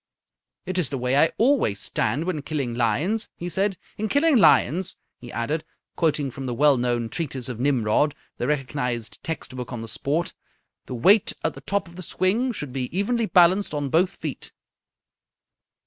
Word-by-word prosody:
"It's 180 Hz, -3 st, -1 dB
the 140 Hz, -, -3 dB
way 125 Hz, +1 st, 0 dB
I 155 Hz, +3 st, +5 dB
always 230 Hz, -, +2 dB
stand 145 Hz, +8 st, -1 dB
when 175 Hz, -5 st, -2 dB
killing 140 Hz, -5 st, -3 dB
lions," 140 Hz, -, 0 dB
he 175 Hz, -, -6 dB
said. 195 Hz, +1 st, 0 dB, 0.2 s
"'In 215 Hz, 0 st, -1 dB
killing 285 Hz, +2 st, +4 dB
lions,'" 170 Hz, -, +4 dB, 0.2 s
he 120 Hz, -, -10 dB
added, 150 Hz, +7 st, -2 dB, 0.3 s
quoting 150 Hz, -4 st, +1 dB
from 135 Hz, +1 st, -6 dB
the 120 Hz, -, -2 dB
well 145 Hz, +2 st, +5 dB
known 120 Hz, -1 st, 0 dB
treatise 135 Hz, -2 st, -3 dB
of 125 Hz, -3 st, -6 dB
Nimrod, 130 Hz, +1 st, +2 dB, 0.2 s
the 120 Hz, -, -1 dB
recognized 125 Hz, -5 st, -2 dB
text 160 Hz, -5 st, -5 dB
book 125 Hz, -1 st, -6 dB
on 120 Hz, -2 st, -5 dB
the -, -, -7 dB
sport, 150 Hz, +9 st, -1 dB, 0.5 s
"'the 125 Hz, -, -5 dB
weight 195 Hz, -, +4 dB
at 160 Hz, -, 0 dB
the 135 Hz, -, -11 dB
top 195 Hz, +7 st, -1 dB
of 170 Hz, +1 st, -14 dB
the -, -, -6 dB
swing 195 Hz, +9 st, +1 dB
should 150 Hz, -, -6 dB
be 130 Hz, -2 st, -2 dB
evenly 230 Hz, +3 st, +1 dB
balanced 180 Hz, -1 st, +4 dB
on 145 Hz, -1 st, -2 dB
both 175 Hz, +6 st, +2 dB
feet.'" -, -, -6 dB
150 Hz, 175 wpm, -24 LUFS, 125-185 Hz, 0.5 s, I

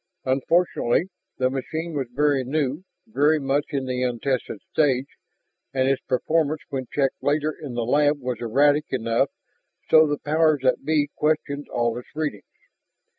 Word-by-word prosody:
Unfortunately, 160 Hz, +4 st, +1 dB, 0.3 s
the 130 Hz, 0 st, +1 dB
machine 160 Hz, +5 st, -4 dB
was 135 Hz, -4 st, -2 dB
very 145 Hz, 0 st, +2 dB
new, 140 Hz, +3 st, -1 dB, 0.2 s
very 155 Hz, -8 st, +2 dB
much 140 Hz, +1 st, 0 dB
in 140 Hz, -3 st, -2 dB
the 125 Hz, -1 st, -2 dB
untested 125 Hz, -2 st, -1 dB
stage, 135 Hz, -4 st, +2 dB, 0.7 s
and 130 Hz, 0 st, +2 dB
its 135 Hz, -1 st, +1 dB
performance 155 Hz, +3 st, 0 dB
when 130 Hz, -3 st, -4 dB
checked 135 Hz, -2 st, 0 dB
later 150 Hz, +1 st, +1 dB
in 135 Hz, -5 st, -6 dB
the 120 Hz, -1 st, -1 dB
lab 145 Hz, +3 st, +3 dB
was 125 Hz, -2 st, -3 dB
erratic 145 Hz, +6 st, +3 dB
enough 115 Hz, -2 st, +1 dB, 0.6 s
so 155 Hz, 0 st, +7 dB
the 145 Hz, 0 st, -1 dB
powers 155 Hz, -1 st, +2 dB
that 130 Hz, -, +2 dB
be 150 Hz, -2 st, +2 dB
questioned 150 Hz, -2 st, -1 dB
all 120 Hz, -1 st, 0 dB
its 125 Hz, -, -14 dB
readings. 150 Hz, -10 st, -2 dB
140 Hz, 150 wpm, -24 LUFS, 130-150 Hz, 0.7 s, so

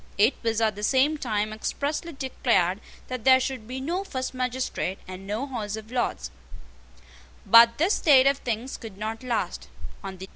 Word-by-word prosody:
It 215 Hz, +6 st, +5 dB
was 225 Hz, -1 st, 0 dB
at 215 Hz, -2 st, +2 dB
the 205 Hz, -, -8 dB
same 275 Hz, +7 st, +2 dB
time 215 Hz, -4 st, -1 dB
expressly 290 Hz, +9 st, -3 dB
declared 235 Hz, -, 0 dB, 0.3 s
that 255 Hz, -3 st, -5 dB
there 260 Hz, +1 st, +7 dB
should 255 Hz, -4 st, -4 dB
be 255 Hz, +2 st, -5 dB
no 340 Hz, +8 st, -2 dB
first 260 Hz, -10 st, -4 dB
magistrate, 255 Hz, -6 st, -2 dB
and 185 Hz, +1 st, -9 dB
no 215 Hz, +6 st, -2 dB
House 220 Hz, -6 st, -4 dB
of 220 Hz, +1 st, -10 dB
Lords. 65 Hz, -, -2 dB, 1.1 s
But 230 Hz, 0 st, +7 dB
this 350 Hz, +7 st, +2 dB
state 270 Hz, -4 st, +5 dB
of 275 Hz, 0 st, +3 dB
things 240 Hz, +2 st, -3 dB
could 220 Hz, -5 st, -10 dB
not 220 Hz, +2 st, -4 dB
last. 215 Hz, -, -3 dB
240 Hz, 160 wpm, -26 LUFS, 215-265 Hz, 1.1 s, there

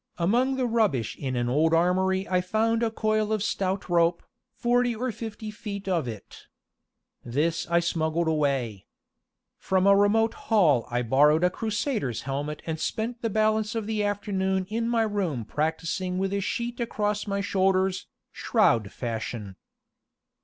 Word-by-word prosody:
Among 240 Hz, +10 st, +2 dB
the 260 Hz, -1 st, 0 dB
rubbish 215 Hz, -, +1 dB
in 130 Hz, -3 st, -4 dB
an 120 Hz, 0 st, 0 dB
old 155 Hz, +6 st, +3 dB
armory 190 Hz, +3 st, +2 dB
I 180 Hz, -1 st, +1 dB
found 220 Hz, +5 st, +1 dB
a 230 Hz, -, +2 dB
coil 215 Hz, -1 st, 0 dB
of 215 Hz, -2 st, 0 dB
stout 190 Hz, -2 st, -1 dB
rope, 170 Hz, -1 st, +2 dB, 0.3 s
forty 245 Hz, 0 st, +1 dB
or 250 Hz, +3 st, -2 dB
fifty 220 Hz, -1 st, -7 dB
feet 210 Hz, -3 st, -7 dB
of 170 Hz, -8 st, 0 dB
it. 110 Hz, -4 st, -9 dB, 0.8 s
This 155 Hz, +8 st, -1 dB
I 170 Hz, 0 st, +3 dB
smuggled 165 Hz, -1 st, 0 dB
away. 135 Hz, -10 st, -1 dB, 0.7 s
From 190 Hz, 0 st, +1 dB
a 200 Hz, 0 st, +7 dB
remote 220 Hz, +3 st, +3 dB, 0.2 s
hall 160 Hz, -, +4 dB
I 120 Hz, +1 st, -1 dB
borrowed 150 Hz, +7 st, +4 dB
a 180 Hz, -, +3 dB
Crusader's 215 Hz, -, -2 dB
helmet 145 Hz, +3 st, -4 dB
and 160 Hz, -1 st, -3 dB
spent 230 Hz, +6 st, -3 dB
the 230 Hz, -, -1 dB
balance 215 Hz, +1 st, +1 dB
of 225 Hz, -2 st, -2 dB
the 215 Hz, -1 st, -1 dB
afternoon 190 Hz, -2 st, -1 dB
in 230 Hz, +2 st, -1 dB
my 230 Hz, -1 st, +2 dB
room 185 Hz, -, -2 dB
practicing 165 Hz, -, -2 dB
with 195 Hz, +1 st, -1 dB
a 200 Hz, -, 0 dB
sheet 235 Hz, +4 st, -3 dB
across 210 Hz, -3 st, -1 dB
my 200 Hz, 0 st, -1 dB
shoulders, 190 Hz, -1 st, +1 dB, 0.2 s
shroud 110 Hz, -3 st, +2 dB
fashion. 110 Hz, -4 st, -5 dB
190 Hz, 155 wpm, -26 LUFS, 155-215 Hz, 0.8 s, a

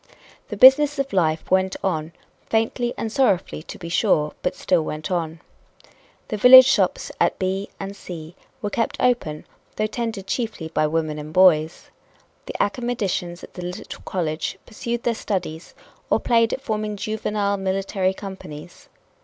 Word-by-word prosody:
The -, -, -6 dB
business 280 Hz, +3 st, +7 dB
of 275 Hz, -5 st, -2 dB
life 160 Hz, -4 st, 0 dB
went 190 Hz, 0 st, +2 dB
on, 160 Hz, -4 st, -1 dB, 0.4 s
faintly 225 Hz, +2 st, 0 dB
and 220 Hz, -, -3 dB
sorrowfully, 200 Hz, -, +1 dB
to -, -, -10 dB
be 170 Hz, -, -8 dB
sure, 165 Hz, -4 st, +1 dB
but 180 Hz, -, -1 dB
still 180 Hz, -3 st, +1 dB
went 155 Hz, +2 st, -5 dB
on. 165 Hz, -2 st, -2 dB, 0.9 s
The 215 Hz, -, -2 dB
village 255 Hz, +4 st, +10 dB
shops -, -, +1 dB
at -, -, +2 dB
B 190 Hz, +1 st, -2 dB
and 195 Hz, 0 st, -6 dB
C 170 Hz, -3 st, -9 dB, 0.3 s
were 205 Hz, -, -2 dB
kept 230 Hz, +1 st, -1 dB
open, 235 Hz, -12 st, 0 dB, 0.3 s
though 215 Hz, -, 0 dB
tended 220 Hz, -3 st, -4 dB
chiefly 215 Hz, -7 st, -3 dB
by 155 Hz, -1 st, +1 dB
women 155 Hz, -1 st, -2 dB
and 150 Hz, +1 st, -8 dB
boys. 160 Hz, -3 st, +3 dB, 0.6 s
The -, -, -6 dB
academicians 205 Hz, -7 st, -2 dB
at -, -, -11 dB
the 180 Hz, -, -8 dB
little 180 Hz, +1 st, -7 dB
college 160 Hz, -4 st, -3 dB
pursued 235 Hz, +1 st, -4 dB
their 235 Hz, -, +1 dB
studies 180 Hz, -7 st, -4 dB, 0.3 s
or -, -, +3 dB
played 230 Hz, -1 st, +2 dB
at -, -, -3 dB
forming 215 Hz, -3 st, -3 dB
juvenile 210 Hz, -1 st, -1 dB
military 190 Hz, 0 st, -1 dB
companies. 180 Hz, -5 st, -10 dB
190 Hz, 155 wpm, -22 LUFS, 165-225 Hz, 0.9 s, village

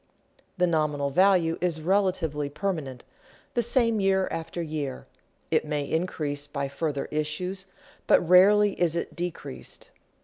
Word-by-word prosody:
The 180 Hz, -, +3 dB
nominal 150 Hz, -4 st, 0 dB
value 180 Hz, 0 st, +3 dB
is 175 Hz, -3 st, 0 dB
relatively 165 Hz, -5 st, 0 dB
permanent, 150 Hz, -6 st, -4 dB, 0.5 s
the 240 Hz, -, +2 dB
same 230 Hz, -1 st, +2 dB
year 190 Hz, -1 st, +2 dB
after 165 Hz, +1 st, -5 dB
year; 150 Hz, -5 st, -4 dB, 0.5 s
it -, -, +3 dB
may 150 Hz, -1 st, -2 dB
increase 145 Hz, -2 st, -2 dB
by 140 Hz, -2 st, -3 dB
further 140 Hz, 0 st, -2 dB
issues, 180 Hz, +6 st, -3 dB, 0.4 s
but 175 Hz, -, +4 dB
rarely 205 Hz, +3 st, +6 dB
is 170 Hz, -2 st, +2 dB
it 170 Hz, -, -4 dB
decreased. 170 Hz, -6 st, -6 dB
165 Hz, 130 wpm, -26 LUFS, 150-185 Hz, 0.5 s, rarely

